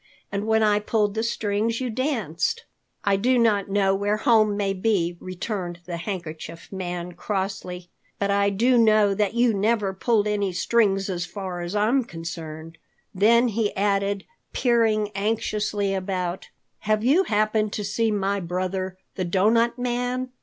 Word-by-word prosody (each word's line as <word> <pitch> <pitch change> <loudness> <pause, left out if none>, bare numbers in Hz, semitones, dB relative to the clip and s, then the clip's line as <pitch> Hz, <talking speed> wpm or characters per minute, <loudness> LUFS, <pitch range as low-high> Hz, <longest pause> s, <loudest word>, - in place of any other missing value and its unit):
And 200 +2 -2
when 220 0 +3
I 210 -1 +3
pulled 210 -1 0
the 220 - -1
strings 225 0 -1
you 255 -2 -2
danced." 245 - -1 0.4
"I 200 -1 +2
do 250 +5 +2
not 210 -4 +2
know 195 -1 +2
where 205 +2 0
home 215 -3 +3
may 200 -1 0
be," 185 -4 0
returned 185 -1 -5
the 170 0 -4
Handkerchief 170 -3 -6
Man 180 -2 -4
crossly, 185 -2 -4 0.3
"but 200 0 0
I 200 0 +3
do 240 +5 +3
know 215 -3 +5
that 205 +2 0
you 240 -1 +3
never 205 -1 +1
pulled 210 +2 +1
any 205 -3 0
strings 195 0 +2
as 175 -2 -3
far 185 -2 -5
as 175 +3 -4
I 210 +1 +2
am 260 +3 +3
concerned." 165 -3 -8 0.3
Then 235 +5 +4
he 215 -1 -1
added, 200 0 0 0.3
peering 225 -4 +2
anxiously 210 -1 -1
about, 185 -1 -3 0.3
"Have 215 0 0
you 310 +10 +4
happened 215 0 +1
to 210 - -3
see 220 +3 0
my 200 -1 0
brother, 185 +1 -3 0.2
the 185 - -3
Doughnut 225 +7 +2
Man? 250 +1 -2
205 Hz, 155 wpm, -24 LUFS, 190-225 Hz, 0.4 s, know